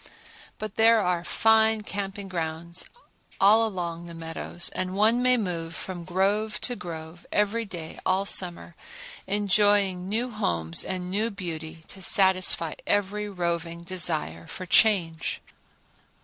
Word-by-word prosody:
But 215 -1 -7
there 225 0 +5
are 180 -4 0
fine 220 +2 +3
camping 200 -1 -5
grounds 170 0 -3 0.5
all 220 +3 +5
along 175 -4 -5
the 170 - -9
meadows, 165 +1 -3
and 185 0 -4
one 220 +4 +3
may 250 0 +4
move 170 -6 -3
from 175 -3 -7
grove 200 +4 0
to 245 - -1
grove 165 -3 -9
every 210 +3 0
day 170 -5 -7
all 190 +1 +1
summer, 175 -3 +2 0.5
enjoying 200 -2 +2
new 235 +4 -1
homes 85 - -1
and 180 -1 -4
new 215 +4 0
beauty 165 -5 -7
to 190 - -9
satisfy 185 -4 +4
every 205 +1 0
roving 170 -2 -3
desire 160 - 0
for 185 - -7
change. 175 -5 +2
185 Hz, 130 wpm, -26 LUFS, 170-210 Hz, 0.5 s, there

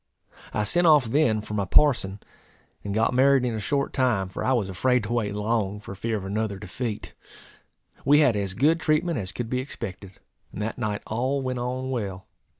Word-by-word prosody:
I 105 - 0
sent 175 +10 +2
off 150 -5 +6
then 115 -3 +2
for 105 - -8
my 100 -2 0
parson, 105 -7 +3 0.6
and 100 - -4
got 110 +2 +2
married 135 0 +4
in 120 - -1
a 110 - -3
short 140 +6 -1
time; 120 -8 +1
for - - -5
I 130 - +1
was 115 -7 +1
afraid 125 +6 +1
to 110 +3 -3
wait 105 -4 -1
long, 105 -1 -1
for 105 - -9
fear 110 +3 -2
of 95 - -6
another 100 0 -2
defeat. 105 +3 -5 0.9
We 145 +2 +5
had 130 -7 +4
as 100 -2 -2
good 155 +8 +3
treatment 155 -1 +1
as 95 -2 -4
could 120 +3 -4
be 125 +2 -1
expected; 100 -7 -7 0.4
and - - -8
that 110 +4 -3
night 105 -3 -2
all 130 +5 -1
went 130 -1 -2
on 130 +2 -3
well. 100 -6 -4
115 Hz, 200 wpm, -25 LUFS, 105-130 Hz, 0.9 s, off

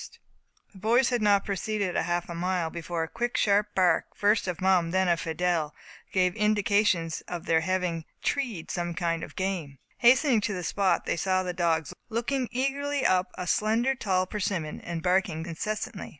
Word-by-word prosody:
The 190 - -13
boys 235 +5 +3
had 245 -3 0
not 205 -2 +3
proceeded 200 -1 -2
a - - +2
half 175 0 -1
mile, 175 -1 -1
before 170 -1 -3
the - - -14
quick 240 +1 -2
sharp 205 0 +2
bark, 185 -2 +3
first 205 -1 +2
of 180 -2 -3
Mum, 185 -3 +3
then 190 +1 +1
of 170 -2 +2
Fidelle, 165 -2 -1 0.4
gave 185 -2 +2
indications 205 -5 +2
of 175 -2 -5
their 160 - +3
having 175 -2 -1 0.2
"treed" 235 - -2
some 175 -1 -3
kind 170 -1 -1
of - - -9
game. 180 -8 -3 0.2
Hastening 245 -1 +5
to 205 0 -1
the 180 - -4
spot, 195 +1 +1
they - - -1
saw 185 +1 +1
the 180 -1 -3
dogs 165 -4 0 0.2
looking 240 +3 -1
eagerly 275 +2 -1
up 185 0 +3
a 180 - -4
slender, 225 +8 +2
tall 185 -7 0
persimmon, 185 -6 -3
and 170 -1 -5
barking 180 -3 +1
incessantly. 210 +5 -4
185 Hz, 175 wpm, -27 LUFS, 170-215 Hz, 0.4 s, Hastening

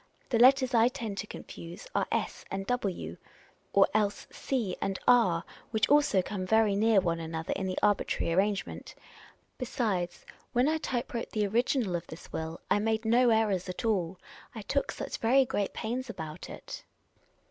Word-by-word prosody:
The 230 - +2
letters 260 +1 +6
I 230 0 +6
tend 230 -6 -4
to 210 - -4
confuse 170 -3 -9
are - - +1
.y - - +1 0.2
and 195 0 -3 0.2
re, 85 - -4 0.5
or 200 - +5
else 205 -1 0 0.3
e 235 -8 +1
and 195 -1 -1
r, 190 -9 +5 0.3
which 220 -2 +1
also 290 -10 +4
come 190 -1 -4
very 215 +1 +3
near 215 0 +4
one 170 -3 0
another 160 0 -3
in 190 - -2
the 185 - -3
arbitrary 200 -4 +1
arrangement. 195 +2 -1 0.6
Besides, 210 -9 -2 0.3
when 245 +3 +3
I 315 +1 +1
type 245 -5 -3
wrote 235 - -3
the 210 -1 0
original 225 -1 +1
of 175 0 -4
this 160 - -11
will, 160 +1 -4
I - - +3
made 220 +1 0
no 240 +2 +4
errors 210 -5 +2
at 180 - -5
all; 190 -5 0 0.4
I 220 - -6
took 280 +6 0
such - - -5
very 260 +4 +4
great 205 -5 -1
pains 245 +3 -4
about 160 -6 -7
it." - - -8
210 Hz, 170 wpm, -30 LUFS, 185-240 Hz, 0.6 s, letters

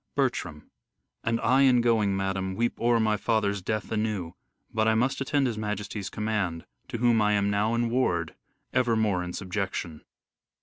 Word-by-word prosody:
Bertram: 90 - -2 0.5
And 115 0 0
I 130 +2 +4
in 130 -3 +5
going, 110 -5 +2
madam, 95 -1 -2
weep 120 +2 -1
o'er 120 0 +3
my 110 -1 +2
father's 100 -2 0
death 110 +3 -3
anew; 105 -6 -2 0.4
but 110 0 +2
I 110 - +4
must 125 +4 +1
attend 140 0 +1
his 115 -4 -2
majesty's 105 -1 -4
command, 105 -6 -2 0.2
to - - -4
whom 120 -1 +3
I 105 0 +3
am 100 0 +2
now 105 +3 +1
in 115 0 0
ward 85 -10 0 0.4
evermore 110 -7 +2
in 90 0 -6
subjection. 90 -4 -4
110 Hz, 165 wpm, -27 LUFS, 95-115 Hz, 0.5 s, in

